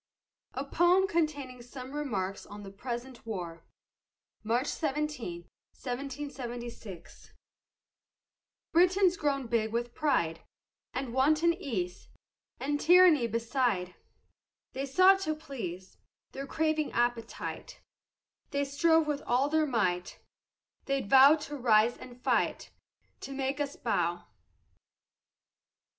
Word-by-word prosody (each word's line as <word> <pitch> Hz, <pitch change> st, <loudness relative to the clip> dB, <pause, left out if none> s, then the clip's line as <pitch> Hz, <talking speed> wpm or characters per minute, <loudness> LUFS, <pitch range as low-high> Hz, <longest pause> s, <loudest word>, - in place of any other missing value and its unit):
A 270 Hz, -, -3 dB
POEM 350 Hz, +6 st, +3 dB
CONTAINING 290 Hz, -8 st, -2 dB
SOME 255 Hz, +1 st, -9 dB
REMARKS 205 Hz, -10 st, -3 dB
ON 205 Hz, 0 st, -9 dB
THE 195 Hz, -, -9 dB
PRESENT 240 Hz, +4 st, -6 dB
WAR 175 Hz, -7 st, -6 dB, 0.8 s
[March 235 Hz, +4 st, +1 dB
17, 295 Hz, -, -3 dB, 0.3 s
1776] 245 Hz, -, -7 dB, 1.4 s
Britons 365 Hz, +2 st, +4 dB
grown 280 Hz, -5 st, -1 dB
big 225 Hz, -2 st, 0 dB
with 240 Hz, +1 st, -2 dB
pride 170 Hz, -, 0 dB, 0.5 s
And 255 Hz, -2 st, -4 dB
wanton 310 Hz, +6 st, +3 dB
ease, 200 Hz, -, -4 dB, 0.5 s
And 290 Hz, +1 st, -1 dB
tyranny 345 Hz, -7 st, +6 dB
beside, 230 Hz, -5 st, -1 dB, 0.8 s
They 270 Hz, +2 st, -3 dB
sought 370 Hz, +7 st, +6 dB
to 310 Hz, -5 st, -1 dB
please 215 Hz, -, -7 dB, 0.3 s
Their 275 Hz, +1 st, -6 dB
craving 310 Hz, -1 st, 0 dB
appetite, 240 Hz, -, -2 dB, 0.7 s
They 285 Hz, 0 st, 0 dB
strove 320 Hz, +3 st, +3 dB
with 295 Hz, -1 st, -2 dB
all 255 Hz, +4 st, +2 dB
their 310 Hz, 0 st, +2 dB
might, 185 Hz, -8 st, -1 dB, 0.7 s
They 275 Hz, -1 st, 0 dB
vow'd 275 Hz, +7 st, +7 dB
to 295 Hz, 0 st, -6 dB
rise 235 Hz, -3 st, +4 dB
and 250 Hz, -1 st, -11 dB
fight, -, -, 0 dB, 0.5 s
To 275 Hz, -, -7 dB
make 270 Hz, +1 st, -2 dB
us 285 Hz, -1 st, -2 dB
bow. 175 Hz, -6 st, -1 dB
265 Hz, 105 wpm, -30 LUFS, 230-300 Hz, 1.4 s, vow'd